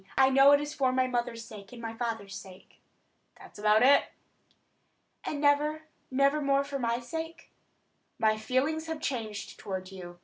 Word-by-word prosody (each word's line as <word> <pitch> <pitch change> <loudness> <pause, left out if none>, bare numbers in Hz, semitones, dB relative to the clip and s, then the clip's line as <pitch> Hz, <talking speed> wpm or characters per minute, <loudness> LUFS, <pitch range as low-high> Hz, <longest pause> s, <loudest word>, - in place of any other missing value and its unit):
I 265 0 +5
know 275 +1 +7
it 285 - +6
is 295 0 -4
for 260 -2 +1
my 255 0 +2
mother's 240 -2 -2
sake 210 -4 -11
and 240 - -10
my 225 -1 -5
father's 225 -4 -4
sake." 190 -1 -12 0.6
"That's - - -14
about 215 +2 +4
it." 280 +2 +6 1.2
"And 290 - -3
never, 300 +2 +2 0.3
never 275 +3 +2
more 275 0 +2
for 280 0 -5
my 235 -1 0
sake?" 325 +6 -7 0.7
"My 215 -1 +3
feelings 275 +8 -1
have 320 -1 -4
changed 220 -8 -4
toward 190 -2 -5
you. 175 -2 -9
255 Hz, 165 wpm, -29 LUFS, 220-285 Hz, 1.2 s, know